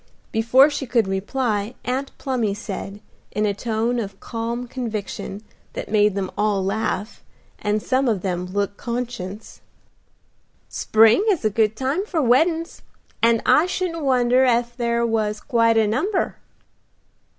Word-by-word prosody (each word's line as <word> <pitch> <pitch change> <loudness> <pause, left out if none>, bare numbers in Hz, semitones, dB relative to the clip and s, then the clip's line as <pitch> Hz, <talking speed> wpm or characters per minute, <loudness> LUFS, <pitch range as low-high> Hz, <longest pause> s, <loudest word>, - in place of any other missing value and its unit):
Before 235 +5 +5
she 275 -2 -4
could 230 -4 +2
reply 210 +2 -1
Aunt 265 +2 -2
Plumy 235 -7 -1
said, 205 -1 -6 0.3
in 210 - 0
a 205 - +1
tone 230 +3 -1
of 195 -3 -6
calm 235 +1 -4
conviction, 215 -4 -5 0.3
that - - -6
made 210 -2 +3
them 195 -2 -2
all 205 -2 +1
laugh, 215 +1 -2 0.4
and 210 0 -1
some 265 +1 +1
of 210 -6 0
them 180 -2 -2
look 200 +1 -2
conscious, 235 -4 -5 1.1
"Spring 225 - +4
is 360 - +1
a 215 - +3
good 215 +1 +2
time 270 - -1
for 375 -6 -2
weddin's, 320 +6 +2 0.4
and 230 0 +3
I 325 - +5
shouldn't 355 -3 -2
wonder 255 -1 +3
ef 240 -1 +1
there 235 -1 0
was 215 -2 0
quite 230 -2 +2
a 220 - +4
number." 315 - -1
230 Hz, 140 wpm, -22 LUFS, 210-255 Hz, 1.1 s, Before